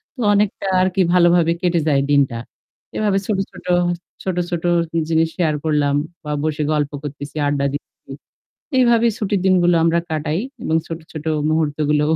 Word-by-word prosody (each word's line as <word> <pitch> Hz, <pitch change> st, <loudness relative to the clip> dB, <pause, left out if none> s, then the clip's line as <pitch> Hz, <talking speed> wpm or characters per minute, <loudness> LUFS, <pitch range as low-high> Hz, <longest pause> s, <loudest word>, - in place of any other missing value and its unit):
তো 250 Hz, -, -6 dB
অনেকটা 200 Hz, -1 st, 0 dB, 0.2 s
আরকি 185 Hz, +1 st, +1 dB
ভালোভাবে 175 Hz, -1 st, +4 dB
কেটে 175 Hz, -2 st, +2 dB
যায় 140 Hz, -2 st, +3 dB
দিনটা। 135 Hz, -4 st, +2 dB, 0.6 s
এভাবে 205 Hz, -2 st, +1 dB
ছোট, 210 Hz, -3 st, 0 dB
ছোট, 180 Hz, -, -14 dB, 0.6 s
ছোট 185 Hz, -2 st, -2 dB
ছোট 175 Hz, -1 st, -3 dB, 0.5 s
জিনিস 160 Hz, 0 st, +3 dB
শেয়ার 160 Hz, -4 st, +1 dB
করলাম 145 Hz, -2 st, +2 dB, 0.3 s
বা 150 Hz, -, -5 dB
বসে 155 Hz, -1 st, -1 dB
গল্প 150 Hz, -1 st, 0 dB
করতেছি, 145 Hz, +1 st, -7 dB
আড্ডা 140 Hz, -1 st, 0 dB
দিতেছি। 145 Hz, -, -9 dB, 0.7 s
এভাবে 235 Hz, -2 st, +4 dB
ছুটির 205 Hz, -2 st, -1 dB
দিনগুলো 175 Hz, -2 st, +4 dB
আমরা 165 Hz, +1 st, +3 dB
কাটাই 155 Hz, +3 st, -1 dB, 0.2 s
এবং 160 Hz, -, +1 dB
ছোট, 165 Hz, 0 st, -5 dB
ছোট 155 Hz, -1 st, -7 dB, 0.3 s
মুহূর্তগুলো 150 Hz, -1 st, +1 dB
165 Hz, 150 wpm, -20 LUFS, 150-185 Hz, 0.7 s, ভালোভাবে